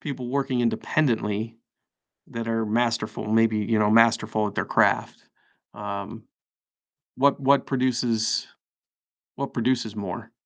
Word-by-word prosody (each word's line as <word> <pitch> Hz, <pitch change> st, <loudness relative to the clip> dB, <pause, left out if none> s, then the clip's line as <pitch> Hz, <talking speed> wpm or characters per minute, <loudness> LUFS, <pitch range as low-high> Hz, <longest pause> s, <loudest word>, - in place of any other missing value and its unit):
people 130 Hz, -4 st, -5 dB
working 135 Hz, -1 st, -1 dB
independently, 115 Hz, -2 st, 0 dB, 0.7 s
that 115 Hz, 0 st, -5 dB
are 115 Hz, 0 st, 0 dB
masterful, 115 Hz, -1 st, -1 dB
maybe, 115 Hz, 0 st, +3 dB
you 105 Hz, +1 st, 0 dB
know, 105 Hz, -1 st, +3 dB
masterful 110 Hz, -1 st, +3 dB
at 100 Hz, -, -9 dB
their -, -, 0 dB
craft, -, -, +1 dB, 0.5 s
um, 100 Hz, -1 st, -6 dB, 0.9 s
what 140 Hz, +1 st, +3 dB
what 140 Hz, +1 st, +3 dB
produces 120 Hz, -3 st, 0 dB, 0.9 s
what 140 Hz, +1 st, -4 dB
produces 120 Hz, -3 st, 0 dB
more? 105 Hz, +3 st, -6 dB
115 Hz, 115 wpm, -25 LUFS, 110-125 Hz, 0.9 s, maybe